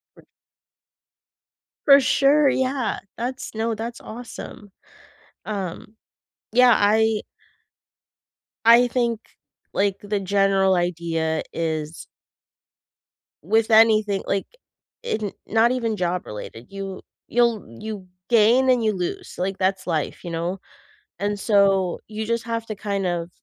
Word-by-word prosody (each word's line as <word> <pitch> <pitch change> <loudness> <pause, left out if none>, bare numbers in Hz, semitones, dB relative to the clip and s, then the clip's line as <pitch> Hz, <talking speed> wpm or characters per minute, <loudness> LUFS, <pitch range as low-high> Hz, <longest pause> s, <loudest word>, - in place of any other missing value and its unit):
Right. - - -19 1.6
For 280 -1 +8
sure, 280 +2 +4
yeah. 260 -2 -1 0.2
That's 255 +2 -5
no, 225 +1 -1
that's 230 +2 -6
awesome. 220 -3 -9 0.7
Um, 200 0 -6 0.6
yeah. 245 +1 +6
I 215 +1 +3 1.4
I 235 +2 +7
think, 235 -2 0 0.5
like, 200 -1 +1
the 205 0 -2
general 195 0 +2
idea 165 -2 -1
is 160 -1 -3 1.4
with 220 +7 +1
anything 215 -3 +4
like, 195 -1 0 0.6
in 220 - -2 0.2
not 225 +2 +3
even 230 -4 -1
job 180 -1 -1
related. 110 +2 -8
You 195 -1 -7 0.3
you'll 235 -3 +1 0.2
you 210 -4 -6 0.2
gain 240 +3 +5
and 250 -2 +3
you 215 -1 +2
lose. 180 -2 -5
Like, 190 +1 -2
that's 190 0 -1
life, 160 -4 -2
you 175 - -6
know? 170 +3 -3 0.6
And 205 +1 -2
so, 195 -4 +2
you 220 0 -5
just 230 +1 -1
have 230 -1 -3
to, 215 - -4
kind 200 -1 -3
of, 170 -1 -2
210 Hz, 120 wpm, -23 LUFS, 185-230 Hz, 1.6 s, For